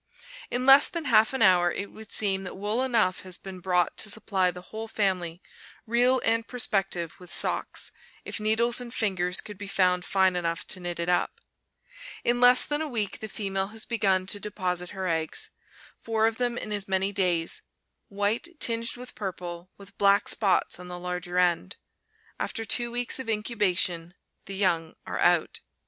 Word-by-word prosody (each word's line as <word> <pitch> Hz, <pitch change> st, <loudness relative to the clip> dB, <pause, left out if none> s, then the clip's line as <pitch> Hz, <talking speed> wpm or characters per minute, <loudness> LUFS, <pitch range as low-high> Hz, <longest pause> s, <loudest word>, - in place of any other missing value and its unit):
In 245 Hz, +1 st, -2 dB
less 275 Hz, +1 st, +9 dB
than 335 Hz, -3 st, -5 dB
half 220 Hz, -4 st, +5 dB
an 265 Hz, -3 st, +1 dB
hour 175 Hz, -2 st, +5 dB
it 200 Hz, -, -5 dB
would 220 Hz, -1 st, -12 dB
seem 195 Hz, -2 st, +1 dB
that 185 Hz, -, -7 dB
wool 210 Hz, +5 st, 0 dB
enough 225 Hz, -8 st, +2 dB
has 185 Hz, -1 st, -2 dB
been 190 Hz, -1 st, -9 dB
brought 180 Hz, -1 st, +1 dB
to 215 Hz, -, +1 dB
supply 200 Hz, -3 st, +1 dB
the 180 Hz, 0 st, -8 dB
whole 220 Hz, +1 st, -5 dB
family, 185 Hz, -5 st, -1 dB, 0.4 s
real 245 Hz, +3 st, +3 dB
and 230 Hz, 0 st, +1 dB
prospective, 195 Hz, -8 st, 0 dB
with 180 Hz, -1 st, -12 dB
socks, -, -, 0 dB, 0.3 s
if -, -, -5 dB
needles 230 Hz, +3 st, +1 dB
and 240 Hz, -1 st, -8 dB
fingers 185 Hz, -6 st, +1 dB
could 210 Hz, -2 st, -10 dB
be 205 Hz, -, -6 dB
found 180 Hz, -2 st, +2 dB
fine 190 Hz, -1 st, +2 dB
enough 170 Hz, -1 st, -2 dB
to 185 Hz, -, -1 dB
knit 175 Hz, -1 st, -5 dB
it 170 Hz, -, -2 dB
up. 180 Hz, -, +1 dB, 0.8 s
In 245 Hz, +1 st, +1 dB
less 250 Hz, 0 st, +7 dB
than 295 Hz, +1 st, -1 dB
a 315 Hz, -, -2 dB
week 215 Hz, -7 st, -2 dB
the 220 Hz, -, -6 dB
female 195 Hz, -2 st, -2 dB
has 220 Hz, +1 st, -7 dB
begun 195 Hz, -5 st, +1 dB
to 205 Hz, +2 st, -1 dB
deposit 180 Hz, -4 st, -3 dB
her 190 Hz, -2 st, -4 dB
eggs, 160 Hz, -2 st, -2 dB, 0.5 s
four 220 Hz, -1 st, 0 dB
of 225 Hz, 0 st, 0 dB
them 245 Hz, -1 st, -1 dB
in 215 Hz, -, -5 dB
as 205 Hz, -1 st, -2 dB
many 190 Hz, +1 st, +1 dB
days, 180 Hz, -4 st, +1 dB, 0.5 s
white 205 Hz, +8 st, -1 dB
tinged 230 Hz, 0 st, 0 dB
with 250 Hz, 0 st, -8 dB
purple, 180 Hz, -3 st, -6 dB
with 200 Hz, -1 st, -15 dB
black 200 Hz, 0 st, +4 dB
spots 195 Hz, -4 st, +2 dB
on 180 Hz, -, -9 dB
the 180 Hz, 0 st, -6 dB
larger 180 Hz, 0 st, -4 dB
end. 175 Hz, -, +1 dB, 0.6 s
After 225 Hz, -, -2 dB
two 240 Hz, +2 st, +1 dB
weeks 245 Hz, +2 st, -1 dB
of 260 Hz, -, -5 dB
incubation 190 Hz, -6 st, 0 dB, 0.3 s
the 195 Hz, -, -6 dB
young 170 Hz, -5 st, 0 dB
are -, -, -4 dB
out. -, -, +2 dB
200 Hz, 180 wpm, -27 LUFS, 180-225 Hz, 0.8 s, less